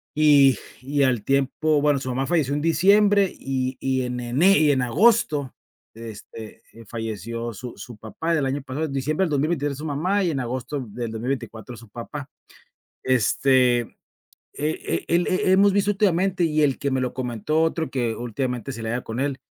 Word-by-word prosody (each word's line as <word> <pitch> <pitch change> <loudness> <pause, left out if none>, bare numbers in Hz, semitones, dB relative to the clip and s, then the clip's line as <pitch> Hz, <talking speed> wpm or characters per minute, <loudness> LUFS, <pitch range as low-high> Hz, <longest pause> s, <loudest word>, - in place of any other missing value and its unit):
y 145 -5 +5 0.2
y 140 +2 0
al 125 -5 +1
tiempo 140 +4 +1
bueno, 145 -1 +2
su 130 - -5
mamá 130 +2 -1
falleció 155 -6 +1
en 145 - -1
diciembre 200 +5 +4
y 130 -1 -2
y 130 -1 0
en 125 0 -3
ene 140 +12 +3
y 150 -1 +4
en 130 -2 +1
agosto, 150 - +2 0.4
este, 110 -1 -10 0.3
falleció 115 +1 -5
su 125 +3 -8
su 120 -3 -10
papá 110 +11 -3
el 145 - 0
año 135 +2 -2
pasado, 140 +4 -3
en 145 - -6
diciembre 150 +6 0
del 165 - -4
2023, 145 0 0
su 150 - -7
mamá 180 +7 0
y 180 - +1
en 145 -4 -2
agosto 130 +2 -4
del 115 +3 -5
2024, 115 0 -5
su 115 -1 -14
papá. 135 +5 -8 0.7
Este, 130 0 +3
eh 115 - -11 0.6
eh, 150 +2 -3
el 170 +1 +2
he 185 0 +1
hemos 195 +1 +5
visto 200 0 +2
últimamente 190 -2 +1
y 155 -2 +1
el 140 -3 +2
que 140 - -2
me 130 0 0
lo 125 -1 -3
comentó, 130 +5 -1
otro 160 -2 -1
que 120 -4 -1
últimamente 125 +2 -3
se 115 -3 -7
la 110 - -3
lleva 120 +2 -2
con 115 +2 -5
él, 135 -1 -1
135 Hz, 185 wpm, -23 LUFS, 125-155 Hz, 0.7 s, y